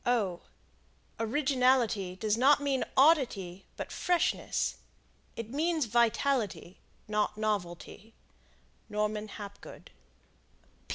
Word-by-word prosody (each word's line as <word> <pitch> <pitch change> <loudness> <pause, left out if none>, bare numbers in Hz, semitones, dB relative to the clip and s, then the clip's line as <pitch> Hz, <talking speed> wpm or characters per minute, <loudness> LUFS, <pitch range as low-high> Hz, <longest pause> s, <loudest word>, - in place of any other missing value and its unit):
Originality 250 -6 +2
does 210 +2 0
not 275 +5 +5
mean 280 -2 0
oddity, 240 - +3
but - - -5
freshness. 355 -1 0 0.6
It 230 0 -6
means 315 +1 +1
vitality, 235 -4 0 0.3
not 210 0 0
novelty. 210 0 -4 0.7
Norman 210 0 -1
Hapgood. 200 -1 -10
225 Hz, 75 wpm, -30 LUFS, 210-270 Hz, 0.7 s, not